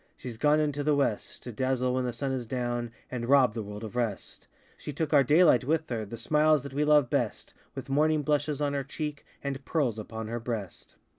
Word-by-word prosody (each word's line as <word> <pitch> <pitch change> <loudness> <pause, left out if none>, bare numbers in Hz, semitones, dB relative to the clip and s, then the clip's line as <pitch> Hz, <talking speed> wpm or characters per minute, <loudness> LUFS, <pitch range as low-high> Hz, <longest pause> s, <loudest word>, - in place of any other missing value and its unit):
SheŌĆÖs 120 -3 -7
gone 150 +3 +4
into 145 -1 0
the 150 0 +3
West, 135 -7 -1
To 125 - -6
dazzle 130 +1 0
when 130 0 0
the 125 - -1
sun 135 +3 -3
is 125 -3 -3
down, 120 -1 -2 0.2
And 120 -1 -4
rob 135 -5 +5
the 115 - -3
world 105 +1 -7
of 110 +1 -7
rest; 115 -5 -3 0.3
She - - -7
took 155 +2 -2
our 140 -2 +7
daylight 150 -1 +5
with 160 +4 0
her, 110 -2 -2
The 115 +3 -8
smiles 150 +1 +3
that 140 -2 -8
we 145 +2 +1
love 150 -3 +5
best, - - -2 0.2
With - - -6
morning 150 +2 +2
blushes 145 0 0
on 145 -1 0
her 140 -1 -1
cheek, 150 +1 -5 0.2
And 140 -1 -4
pearls 130 -10 0
upon 110 +1 -6
her 120 +2 -3
breast. 115 -6 -6
135 Hz, 220 wpm, -28 LUFS, 120-150 Hz, 0.3 s, our